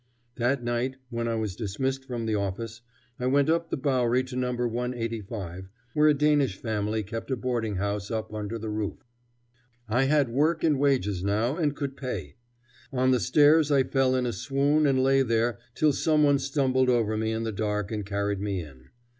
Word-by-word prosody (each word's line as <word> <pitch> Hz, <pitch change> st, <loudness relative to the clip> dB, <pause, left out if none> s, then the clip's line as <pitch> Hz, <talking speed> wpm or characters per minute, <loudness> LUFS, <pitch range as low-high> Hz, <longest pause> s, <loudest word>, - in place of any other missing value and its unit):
That 125 Hz, +2 st, +1 dB
night, 120 Hz, +2 st, -1 dB, 0.2 s
when 115 Hz, 0 st, -2 dB
I 115 Hz, -, 0 dB
was 110 Hz, -4 st, -2 dB
dismissed 130 Hz, +6 st, -2 dB
from 120 Hz, -3 st, -4 dB
the 110 Hz, -, 0 dB
office, 105 Hz, +3 st, -3 dB, 0.4 s
I 125 Hz, -, -1 dB
went 140 Hz, +3 st, +3 dB
up 165 Hz, 0 st, 0 dB
the -, -, -2 dB
Bowery 130 Hz, -2 st, +1 dB
to 130 Hz, 0 st, -8 dB
No. 125 Hz, 0 st, 0 dB
185, 115 Hz, -6 st, -4 dB, 0.2 s
where 150 Hz, 0 st, +4 dB
a 150 Hz, -, +5 dB
Danish 145 Hz, -7 st, +2 dB
family 110 Hz, -1 st, -2 dB
kept 115 Hz, +5 st, -6 dB
a 130 Hz, -, +1 dB
boarding 120 Hz, -4 st, -2 dB
house 100 Hz, +1 st, -2 dB
up 110 Hz, -1 st, -4 dB
under 105 Hz, +1 st, -4 dB
the 110 Hz, -1 st, -5 dB
roof. 105 Hz, 0 st, -4 dB, 0.8 s
I 125 Hz, +5 st, +2 dB
had 140 Hz, -2 st, +3 dB
work 155 Hz, +7 st, +1 dB
and 150 Hz, -4 st, +3 dB
wages 105 Hz, -10 st, +1 dB
now, 110 Hz, +7 st, +1 dB
and 150 Hz, -4 st, 0 dB
could 140 Hz, -2 st, -4 dB
pay. 100 Hz, -, -5 dB, 0.5 s
On 130 Hz, -1 st, +2 dB
the 125 Hz, -, +3 dB
stairs 150 Hz, -, +4 dB
I 140 Hz, -2 st, +4 dB
fell 130 Hz, 0 st, +1 dB
in 130 Hz, -1 st, +1 dB
a 120 Hz, -, -1 dB
swoon 140 Hz, +7 st, +1 dB
and 130 Hz, -2 st, +2 dB
lay 135 Hz, 0 st, +4 dB
there 115 Hz, -1 st, +1 dB, 0.2 s
till 155 Hz, -2 st, +3 dB
some 155 Hz, +1 st, +2 dB
one 145 Hz, -1 st, +4 dB
stumbled 130 Hz, -3 st, +1 dB
over 115 Hz, -3 st, +2 dB
me 110 Hz, +1 st, -1 dB
in 110 Hz, 0 st, -2 dB
the 115 Hz, -, -2 dB
dark 105 Hz, -1 st, -2 dB
and 105 Hz, -2 st, -2 dB
carried 100 Hz, 0 st, -2 dB
me 100 Hz, -2 st, -2 dB
in. 65 Hz, -4 st, -15 dB
120 Hz, 195 wpm, -27 LUFS, 105-135 Hz, 0.8 s, a